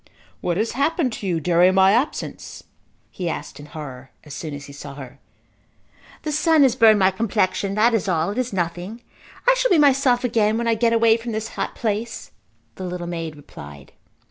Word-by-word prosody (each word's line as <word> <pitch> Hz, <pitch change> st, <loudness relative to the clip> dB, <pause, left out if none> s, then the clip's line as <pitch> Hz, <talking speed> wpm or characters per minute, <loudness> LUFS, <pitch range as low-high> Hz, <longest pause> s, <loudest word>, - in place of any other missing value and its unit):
"What 175 Hz, -1 st, -2 dB
has 220 Hz, +3 st, 0 dB
happened 280 Hz, -1 st, 0 dB
to 200 Hz, -, -5 dB
you 170 Hz, -3 st, 0 dB
during 175 Hz, +3 st, +3 dB
my 190 Hz, 0 st, +6 dB
absence" 245 Hz, +8 st, -2 dB, 0.5 s
he 180 Hz, -2 st, -4 dB
asked -, -, -6 dB
in 145 Hz, -, -11 dB
horror 135 Hz, -4 st, -9 dB
as 150 Hz, -, -11 dB
soon 155 Hz, -2 st, -6 dB
as 145 Hz, 0 st, -9 dB
he 140 Hz, -, -12 dB
saw 140 Hz, 0 st, -9 dB
her. 135 Hz, -3 st, -11 dB, 1.0 s
"The 305 Hz, -, -2 dB
sun 305 Hz, 0 st, +4 dB
has 255 Hz, -3 st, +3 dB
burned 225 Hz, -3 st, +6 dB
my 190 Hz, -1 st, +4 dB
complexion. 195 Hz, -1 st, -1 dB
That 230 Hz, +3 st, +3 dB
is 220 Hz, -3 st, 0 dB
all. 170 Hz, 0 st, 0 dB
It 220 Hz, -, -3 dB
is 255 Hz, -1 st, -2 dB
nothing. 180 Hz, +5 st, -4 dB, 0.4 s
I -, -, +7 dB
shall -, -, +1 dB
be 360 Hz, -, +4 dB
myself 270 Hz, -4 st, +3 dB
again 220 Hz, -3 st, +1 dB
when 235 Hz, 0 st, -2 dB
I 230 Hz, -, +3 dB
get 230 Hz, +1 st, +1 dB
away 230 Hz, -1 st, +4 dB
from 230 Hz, 0 st, -6 dB
this 220 Hz, +1 st, -3 dB
hot -, -, -4 dB
place," 225 Hz, +1 st, -3 dB, 0.5 s
the 190 Hz, -, -6 dB
little 180 Hz, -1 st, -5 dB
maid 165 Hz, -2 st, -5 dB
replied. 70 Hz, -, -12 dB
205 Hz, 195 wpm, -22 LUFS, 170-235 Hz, 1.0 s, I